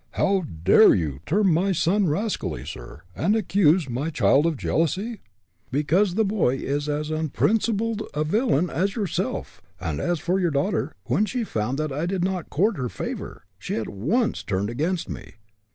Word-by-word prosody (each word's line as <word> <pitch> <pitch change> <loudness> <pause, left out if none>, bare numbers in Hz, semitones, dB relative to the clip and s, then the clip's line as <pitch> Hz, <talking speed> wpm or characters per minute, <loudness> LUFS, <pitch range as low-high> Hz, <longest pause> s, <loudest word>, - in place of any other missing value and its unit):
"How 195 -1 +2 0.2
dare - - +7
you 75 -6 -2
term 195 +1 +3
my 190 +4 +2
son 185 +4 +2
rascally, 200 +8 -2
sir, 80 - -9
and 200 +8 +2
accuse 185 -6 +3
my 130 +6 -2
child 150 -1 +3
of 160 -4 -1
jealousy?" 190 - -1 0.5
"Because 170 +7 +2
the 220 +1 +3
boy 195 -11 +1
is 145 +2 -2
as 150 +1 -2
unprincipled 215 - 0
a 150 - +1
villain 180 - +1
as 190 +8 0
yourself, 205 -6 -3 0.2
and 80 -6 -3
as 175 -2 0
for 180 +4 0
your 175 -2 +2
daughter, 140 -2 -1
when 145 - +1
she 245 +2 -2
found 120 - -2
that 155 -1 -2
I 150 +5 -2
did 185 -1 -1
not 185 -3 -2
court 205 +6 +1
her 125 -2 -2
favor, - - -6 0.2
she - - -4
at 110 - -3
once 170 - 0
turned 100 +2 -2
against 165 +8 -1
me. - - -8
165 Hz, 170 wpm, -24 LUFS, 140-200 Hz, 0.5 s, dare